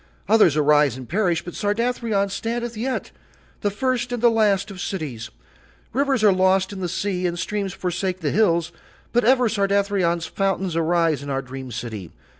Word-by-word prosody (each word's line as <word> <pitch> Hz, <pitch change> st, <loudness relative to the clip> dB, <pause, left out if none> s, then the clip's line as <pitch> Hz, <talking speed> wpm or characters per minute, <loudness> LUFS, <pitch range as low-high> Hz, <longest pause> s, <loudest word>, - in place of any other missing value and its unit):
Others 200 Hz, -8 st, +5 dB
arise 150 Hz, -3 st, +4 dB
and 130 Hz, -2 st, -9 dB
perish 180 Hz, -, 0 dB
but 175 Hz, -, -7 dB
Sardathrion 215 Hz, -1 st, 0 dB
standeth 235 Hz, +2 st, -3 dB
yet, 255 Hz, +4 st, -3 dB, 0.5 s
the 205 Hz, -, +1 dB
first 245 Hz, +3 st, -1 dB
and 245 Hz, -, -2 dB
the 235 Hz, 0 st, +5 dB
last 210 Hz, -2 st, +2 dB
of 185 Hz, -2 st, -8 dB
cities. 135 Hz, -, -4 dB, 0.6 s
Rivers 270 Hz, -2 st, +1 dB
are 205 Hz, -2 st, +6 dB
lost 190 Hz, +1 st, +2 dB
in 195 Hz, -, -7 dB
the 180 Hz, -2 st, -2 dB
sea 185 Hz, 0 st, -1 dB
and 175 Hz, 0 st, -3 dB
streams 200 Hz, +1 st, -2 dB
forsake 185 Hz, 0 st, -3 dB
the -, -, 0 dB
hills, 170 Hz, -5 st, +2 dB, 0.4 s
but 240 Hz, +1 st, +3 dB
ever 250 Hz, 0 st, +4 dB
Sardathrion's 200 Hz, -5 st, +1 dB
fountains 190 Hz, -2 st, -1 dB
arise 165 Hz, -3 st, +1 dB
in 140 Hz, -, -7 dB
our 135 Hz, 0 st, -1 dB
dream 130 Hz, 0 st, -8 dB
city. 110 Hz, -6 st, -6 dB
190 Hz, 170 wpm, -22 LUFS, 165-215 Hz, 0.6 s, are